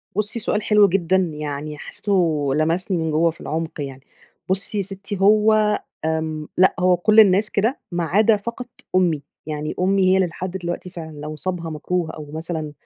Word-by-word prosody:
بُصّي، 210 +3 -2
سؤال 210 0 -1
حلو 210 -1 +5
جدًا، 185 -1 +1 0.2
يعني 150 0 -5
حسّيته 160 -8 0
لمسني 170 +4 0
من 160 -1 -1
جوّه 165 +2 +3
في 165 - -17
العُمق 160 0 -4
يعني. 135 -1 -6 0.5
بُصّي 195 +3 -1
يا 200 - +1
سِتّي، 195 +1 -7
هو 215 +1 +4 0.3
آمم 160 -1 -2
لأ، 185 +1 +5
هو 180 0 +4
كل 215 +5 +4
الناس 205 0 +5
كده، 225 +7 0
ما 175 0 -1
عدا 210 +6 +3
فقط 235 +4 -6 0.3
أمي، 170 -5 +2 0.2
يعني 155 0 -4
أمي 190 0 +3
هي - - +5
اللي 190 -1 +3
لحد 180 +2 -6
دلوقتي 175 0 -5
فعلًا 165 -3 -8
لو 150 +1 -6
صابها 175 0 -4
مكروه 160 +2 -2
أو 155 -2 -9
مثلًا 160 -1 -4
180 Hz, 175 wpm, -22 LUFS, 160-200 Hz, 0.5 s, حلو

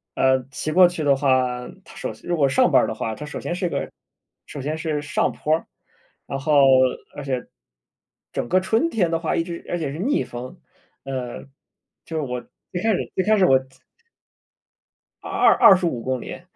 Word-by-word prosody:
呃， - - +1
呃， 130 - -9
骑 140 +4 -4
过 180 +3 +7
去 175 -3 -4
的 140 -2 +4
话， 130 -2 +1 0.2
它 - - -15
首 - - -5
先 - - -13
如 175 - +1
果 140 -3 +4
上 135 - +3
班 - - +5
儿 - - 0
的 - - -3
话， 110 -1 -3
它 150 - -7
首 150 - -6
先 175 - -3
是 180 -1 -1
个 - - -3 0.5
首 145 - -8
先 150 +4 -3
是 155 -2 -2
上 150 - 0
坡 155 +1 0
儿， 165 - -6 0.6
然 135 - -3
后 150 +2 0 0.6
而 145 - -6
且， 130 -3 -3 0.9
整 - - -2
个 185 - +4
春 225 - +1
天 185 -7 +1
的 165 - +2
话 165 - -1
一 165 - +1
直 170 0 -8
而 175 - -2
且 150 -4 -3
是 145 - -6
逆 275 +10 +1
风， 120 +1 -8 0.5
呃， 130 -3 -5 0.6
就 165 - -7
是 - - 0
我 125 -3 -4 0.3
最 180 - -3
开 225 - +3
始 - - -3
最 190 - +1
开 215 +3 +3
始 190 - +5
我 130 -4 +5 1.6
二 - - -5
二 - - -1
25 175 -10 +5
公 130 0 -2
里， - - -8
150 Hz, 215 characters per minute, -22 LUFS, 130-175 Hz, 1.6 s, 过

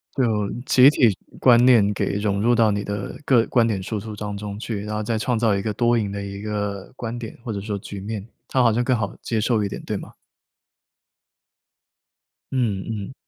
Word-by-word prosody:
就 110 -6 +1 0.2
集 130 +1 +7
体 120 -8 +3 0.2
观 120 -2 +6
念 110 -5 +5
给 100 - -1
融 100 -1 0
入 120 +2 +3
到 110 -1 +4
你 100 0 -1
的 100 0 -4
个 120 -4 +4
观 120 -2 +3
点 100 -4 -1
输 105 +2 -3
出 110 0 -7
当 105 0 -5
中 100 0 -6
去， 110 -2 -4
然 105 0 -4
后 105 - -2
再 115 +1 -1
创 120 +2 0
造 110 -3 +2
一 100 - -1
个 105 +1 -2
多 120 +2 +2
赢 105 -3 -1
的 100 0 -4
一 100 0 -6
个 105 -2 -4
观 115 -1 -5
点， 115 -2 -8
或 115 - -4
者 100 - -4
说 105 0 -3
局 100 0 -8
面， 105 +1 -5 0.2
他 130 - +2
好 115 -2 +4
像 120 +3 +1
更 125 0 +2
好 100 -3 -3
接 115 - -1
受 110 0 +1
一 100 - -1
点， - - -6
对 - - -2
吗？ - - -10 2.4
嗯 110 -7 0
嗯。 105 +1 -5
105 Hz, 230 characters per minute, -23 LUFS, 100-120 Hz, 2.4 s, 集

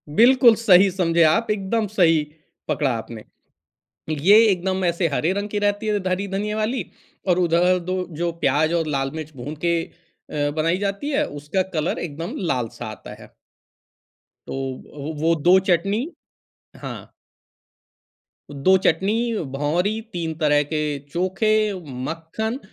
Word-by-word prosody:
बिल्कुल 240 -1 +6
सही 195 -3 +5
समझे 170 -2 +2
आप, 220 +9 +3
एकदम 210 +2 -1
सही 165 -7 +3 0.4
पकड़ा 140 -4 0
आपने। 110 -1 -8 0.9
ये 175 +8 +5
एकदम 190 -1 0
ऐसे 170 0 +1
हरे 155 +5 0
रंग 205 +1 -3
की 210 - -2
रहती 205 +1 0
है, 210 -1 +1
हरी 195 +2 -1
धनिये 205 +2 -2
वाली, 220 +4 -1 0.4
और 180 0 +3
उधर 180 +1 +3
2 185 +1 -3
जो 170 +1 -1
प्याज़ 155 +5 +2
और 165 -2 0
लाल 135 0 -1
मिर्च 155 -1 -6
भून 140 +5 -6
के 170 -1 +2 0.5
अ, 145 -1 -1
बनाई 165 +4 +1
जाती 200 +7 -3
है, 295 +1 +1
उसका 150 +6 -2
कलर 155 +1 -1
एकदम 165 +2 -5
लाल-सा 120 -3 -3
आता 110 - -9
है। - - -14 1.2
तो 135 +3 -6
अ, 150 - -9
वो 165 +1 +3
2 180 +5 +5
चटनी 195 - +1 0.7
हाँ। - - -8 1.4
2 190 +7 +4
चटनी, 210 +7 +1 0.2
भौंरी, 175 +10 0
3 165 -2 -3
तरह 150 -1 +3
के 150 -1 -2
चोखे, 185 +5 0 0.5
मक्खन 170 - -4
175 Hz, 140 wpm, -22 LUFS, 155-205 Hz, 1.4 s, बिल्कुल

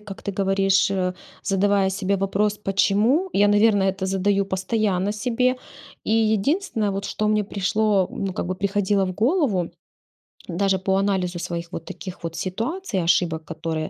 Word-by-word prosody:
как 205 -2 -9
ты 200 - -4
говоришь, 195 0 +2
э, 185 -2 -1 0.3
задавая 195 0 +2
себе 195 0 0
вопрос 205 +2 0
"почему?". 210 - +2
Я, 205 +1 +4
наверно, 205 -1 +4
это 190 0 -1
задаю 195 +1 +1
постоянно 195 0 0
себе. 250 +4 0 0.5
И - - -4
единственное, 220 - +1
вот, 195 0 -3
что 215 +1 -1
мне 210 0 +2
пришло 200 0 +1
ну, 195 -1 -3
как 180 - -3
бы 185 +1 -3
приходило 200 0 +1
в 185 - -4
голову, 225 - +1 0.8
даже 190 +2 +1
по 190 +1 0
анализу 190 -3 0
своих 170 0 -5
вот - - -5
таких 185 -2 -8
вот 165 0 -5
ситуаций, 225 - -2
ошибок, 165 -1 +1
которые 160 0 -4
195 Hz, 155 wpm, -23 LUFS, 185-210 Hz, 0.8 s, Я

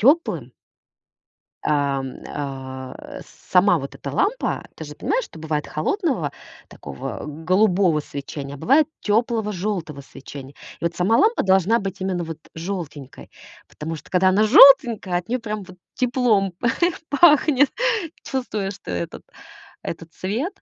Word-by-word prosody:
тёплым. 295 +9 +2 1.1
Ам, 140 -3 0
а, 130 -2 -7 0.3
сама 185 0 +5
вот 140 -2 -6
эта - - -7
лампа, 435 +6 0
ты - - -7
же - - -9
понимаешь, - - -1
что - - -14
бывает 155 -1 -3
холодного 190 - -1 0.4
такого 70 -2 -7
голубого 180 +2 +2
свечения, 140 -1 -7
а - - -11
бывает 275 - +4
тёплого 220 0 +1
жёлтого 180 -7 -3
свечения. 135 0 -11 0.2
И - - -10
вот 170 - -1
сама 190 +6 +3
лампа 450 +3 +3
должна 190 +3 +4
быть 195 -1 -5
именно 185 -2 -1
вот 165 -1 -7 0.2
жёлтенькой, 160 -6 -6 0.4
потому 160 +2 -6
что 155 - -12
когда 185 0 +4
она 205 +3 +3
жёлтенькая, 230 -6 +7
от 180 +5 -13
неё 250 - 0
прям 215 -3 -4
вот 185 -1 -14 0.2
теплом 240 -6 +2
п 235 +7 -2 0.4
пахнет. 290 -2 +5 0.5
Чувствуешь 215 -7 -3
что - - -12
этот 85 -1 -4 0.6
этот 165 0 -6
цвет. 230 - -3
185 Hz, 135 wpm, -22 LUFS, 150-230 Hz, 1.1 s, жёлтенькая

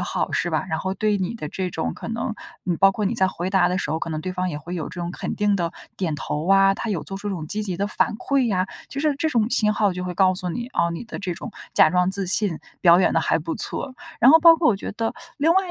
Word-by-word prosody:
好 - - -2
是 175 - 0
吧？ 155 +1 0
然 160 - -1
后 190 +3 -2
对 210 +1 +1
你 190 +5 -2
的 150 -10 -6
这 185 +2 -3
种 165 -2 -3
可 - - -9
能 225 -1 -2 0.3
你 175 -2 0
包 195 +3 +6
括 210 - -2
你 210 - 0
在 190 -5 +3
回 180 0 -4
答 190 -2 +3
的 180 - -1
时 170 -6 -2
候， 160 - 0
可 165 - -4
能 155 -1 -3
对 185 - -3
方 185 0 -2
也 150 - -4
会 170 +4 -7
有 160 -4 -4
这 175 - -7
种 170 - -3
肯 - - -4
定 205 -1 +2
地 170 -3 -1 0.3
点 170 -5 -1
头 150 +2 -4
啊， 195 0 +6
他 230 - -5
有 190 -7 -1
做 195 - -6
出 205 - -5
这 195 - -2
种 155 -3 -6
积 215 +6 -2
极 185 -4 -3
的 200 +3 -1
反 210 - 0
馈 275 -1 +1
呀， 185 -3 +1 0.2
就 275 - -6
是 300 -2 +2
这 315 +2 0
种 230 -5 +1
信 210 -3 +3
号 205 -3 +2
就 180 0 -5
会 180 - -4
告 185 -1 +4
诉 180 -1 -5
你， 240 +8 -4
哦， 170 -9 0
你 170 +7 -5
的 235 - -7
这 180 -3 -3
种 - - -8 0.2
假 - - +6
装 180 +1 +2
自 195 0 -1
信 185 -2 +1 0.2
表 175 0 +6
演 - - +3
得 - - +2
还 - - +1
不 165 +1 -4
错。 265 -2 -5 0.3
然 245 +3 +8
后 320 - +8
包 330 0 +8
括 335 - -12
我 210 - +3
觉 195 - -6
得 225 +1 -2 0.3
另 305 +3 +3
外 380 -1 +1
190 Hz, 320 characters per minute, -23 LUFS, 175-215 Hz, 0.3 s, 然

